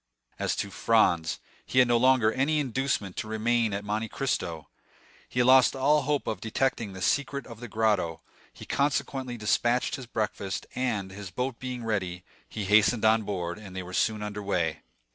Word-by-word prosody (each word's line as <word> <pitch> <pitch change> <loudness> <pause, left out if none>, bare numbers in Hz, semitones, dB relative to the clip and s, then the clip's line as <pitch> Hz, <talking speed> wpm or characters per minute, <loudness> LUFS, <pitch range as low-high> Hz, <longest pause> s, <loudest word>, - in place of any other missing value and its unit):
As - - 0
to 100 - -3
Franz, 90 -7 +2 0.2
he - - -5
had 125 -1 +7
no 120 0 +4
longer 125 -2 +4
any 145 +4 +1
inducement 130 -7 -1
to - - -3
remain 110 +1 +1
at 100 +1 -3
Monte 110 +2 -2
Cristo. 85 - -2 0.6
He 125 - +1
had - - +3
lost 130 +1 +6
all 145 +3 +3
hope 145 +1 -1
of 110 -5 -3
detecting 115 -2 -1
the 95 -1 -6
secret 140 -2 0
of 115 -2 -11
the 120 - -7
grotto; 105 -8 0 0.3
he - - -12
consequently 135 -3 -1
despatched 120 +5 +1
his 130 -3 -9
breakfast, 105 -3 -3
and, 110 -7 -2
his 100 0 -8
boat 125 +5 -3
being 125 -2 -5
ready, 90 -5 -2 0.3
he 105 - -4
hastened 110 +3 +4
on 110 +1 +5
board, 90 -3 -4
and 95 -3 -11
they 95 - -4
were 90 +1 -10
soon 105 +2 +1
under 105 0 -5
way. 85 -6 -1
110 Hz, 180 wpm, -28 LUFS, 100-125 Hz, 0.6 s, had